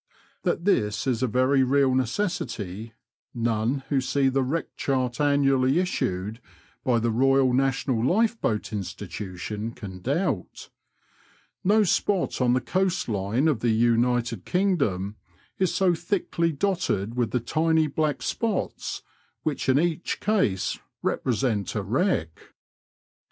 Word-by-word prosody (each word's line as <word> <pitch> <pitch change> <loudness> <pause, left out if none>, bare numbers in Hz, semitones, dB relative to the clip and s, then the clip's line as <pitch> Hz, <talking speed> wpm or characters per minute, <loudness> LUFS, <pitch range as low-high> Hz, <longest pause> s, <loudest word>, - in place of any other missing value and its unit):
That 170 - -1
this 105 - +1
is 125 -3 0
a 130 - +2
very 130 +3 +3
real 135 0 +3
necessity, 115 - -2 0.4
none 115 +3 0
who 140 -2 +2
see 135 +1 +1
the 135 +1 +1
Wreck 145 +6 -2
Chart 130 -1 -1
annually 135 -1 +3
issued 110 - -1 0.4
by 125 -2 +2
the 115 0 +1
Eoyal 135 +2 +3
National 135 -2 +1
Lifeboat 195 - +1
Institution 105 +2 -5
can 95 -5 -8
doubt. 140 - -2 0.9
No 210 +3 +4
spot 195 -3 0
on 125 -1 +3
the 130 - +2
coast 185 +5 0
line 105 +7 0
of 145 -8 +2
the 120 - +1
United 115 -1 +2
Kingdom 140 - 0 0.4
is 185 -2 +2
so 185 -2 +3
thickly 170 -2 -1
dotted 155 - -1
with 120 -2 0
the 125 - 0
tiny 160 +5 +2
black 150 0 -1
spots, 225 -2 -2 0.4
which 150 -3 -2
in 130 - +5
each 170 0 -1
case 190 - 0 0.2
represent 115 -5 0
a 105 - -1
wreck. 135 - -1
130 Hz, 125 wpm, -25 LUFS, 115-160 Hz, 0.9 s, in